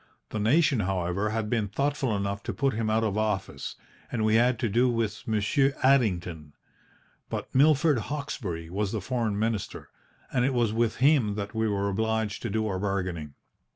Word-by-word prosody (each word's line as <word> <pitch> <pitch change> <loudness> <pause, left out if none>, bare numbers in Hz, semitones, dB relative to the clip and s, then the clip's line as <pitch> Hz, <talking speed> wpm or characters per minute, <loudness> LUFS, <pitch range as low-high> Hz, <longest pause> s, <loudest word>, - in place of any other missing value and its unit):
The 110 - -3
nation, 135 +4 +3
however, 95 +1 -1
had 110 0 -2
been 110 -2 0
thoughtful 135 0 0
enough 100 +1 -2
to - - -2
put 135 -1 +1
him 110 0 -1
out 110 +1 +2
of 105 -1 0
office, 100 -10 -2 0.4
and 110 -3 0
we 110 - +3
had 120 +2 +4
to 115 - 0
do 120 +5 +3
with 115 -3 -2
Monsieur 115 +6 +2
Addington. 90 - +1 0.8
But - - -5
Milord 145 0 +4
Hawkesbury 110 - -4
was 100 +1 -1
the 110 - -2
Foreign 115 -1 -1
Minister, 110 -1 -3 0.4
and 125 - +2
it 135 0 +1
was 115 -3 +2
with 115 0 +1
him 130 -7 +3
that 100 0 -4
we 110 0 0
were 100 -1 0
obliged 110 +1 -1
to 120 - -3
do 110 +2 0
our 95 -3 -2
bargaining. 90 -7 -3
110 Hz, 180 wpm, -27 LUFS, 100-120 Hz, 0.8 s, had